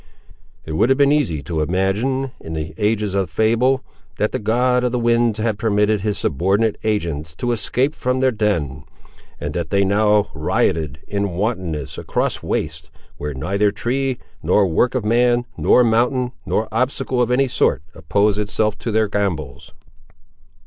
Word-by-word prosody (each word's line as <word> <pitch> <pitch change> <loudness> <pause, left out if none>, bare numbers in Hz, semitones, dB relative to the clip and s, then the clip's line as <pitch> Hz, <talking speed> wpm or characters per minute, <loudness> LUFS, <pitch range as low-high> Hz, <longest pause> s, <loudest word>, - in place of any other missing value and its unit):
It 80 - -5
would 95 +10 +2
have 135 - +4
been 140 0 +4
easy 115 - +1
to 80 -2 -3
have 75 0 -1
imagined, 110 +9 0
in 80 - -8
the 80 0 -4
ages 105 -2 0
of 95 -2 0
fable, 115 +4 +2 0.3
that - - 0
the - - -2
god 125 +4 +2
of 125 - +1
the 125 - 0
winds 115 -2 +2
had 110 -1 -1
permitted 105 -1 +2
his 105 0 -1
subordinate 100 +9 +1
agents 80 -8 -2
to 120 +8 -2
escape 125 +5 0
from 125 -3 -1
their 130 0 +3
den, 85 - -1 0.6
and - - -4
that 85 -2 -3
they 100 0 +2
now 105 +1 +2
rioted, 75 -2 0
in 100 -2 -2
wantonness, 90 - -3
across - - -1
wastes, - - -3 0.3
where 75 -1 -5
neither 100 +9 +1
tree, 130 +5 -1 0.2
nor 105 - +3
work 95 +9 +1
of 125 -5 -1
man, 120 +2 +3
nor 125 - +4
mountain, 120 +2 +1 0.2
nor 110 - 0
obstacle 130 +1 0
of 120 - +1
any 130 +2 +3
sort, 95 - +1
opposed 100 +6 +1
itself 105 0 0
to - - -4
their 110 0 +2
gambols. 100 -8 -3
105 Hz, 165 wpm, -20 LUFS, 95-120 Hz, 0.6 s, have